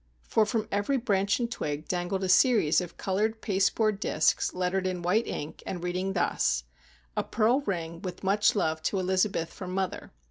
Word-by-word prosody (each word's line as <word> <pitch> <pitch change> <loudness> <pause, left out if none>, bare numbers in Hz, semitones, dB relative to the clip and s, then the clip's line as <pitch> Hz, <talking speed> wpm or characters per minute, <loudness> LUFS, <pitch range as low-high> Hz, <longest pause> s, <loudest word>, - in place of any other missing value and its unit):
For 220 -2 +2
from 220 -2 -1
every 205 +7 +1
branch 200 -4 +1
and 235 -1 -2
twig 150 -8 -4
dangled 180 +2 -2
a - - 0
series 190 - +4
of 175 -1 -8
coloured 215 +4 -1
pasteboard 200 +1 +1
discs, 155 -5 +1
lettered 185 +1 -1
in 180 -2 -3
white 205 +7 +2
ink, 150 +2 -5
and 175 -2 -5
reading 180 +2 -1
thus:— 65 - +1 0.5
"A - - 0
pearl 235 +5 +2
ring, 170 -3 -3
with 185 0 -6
much 200 +3 +3
love 160 -5 0
to 195 - -1
Elizabeth 185 -2 0
from 185 -2 -6
mother." 190 -1 -3
190 Hz, 175 wpm, -28 LUFS, 175-210 Hz, 0.5 s, series